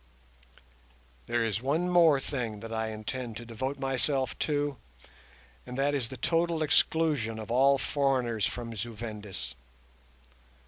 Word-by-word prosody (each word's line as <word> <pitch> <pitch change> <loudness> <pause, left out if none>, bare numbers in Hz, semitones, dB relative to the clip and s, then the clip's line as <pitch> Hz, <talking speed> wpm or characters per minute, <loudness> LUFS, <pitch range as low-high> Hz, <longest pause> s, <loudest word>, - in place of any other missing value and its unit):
There 120 -1 +1
is 110 -1 -1
one 155 +7 +1
more 170 -5 +6
thing 115 -7 -3
that 115 0 -6
I 110 0 -1
intend 110 +2 -4
to 120 - -8
devote 130 +5 -3
myself 135 -1 0
to, 145 -2 0 0.9
and 125 0 -7
that 140 +1 +2
is 135 -5 0
the 130 - -7
total 165 +1 +1
exclusion 150 -7 +2
of 110 0 -6
all 135 +3 +5
foreigners 130 -7 +1
from 115 -2 -5
Zu 110 +2 -4
Vendis. 105 - -6
125 Hz, 135 wpm, -30 LUFS, 115-145 Hz, 0.9 s, more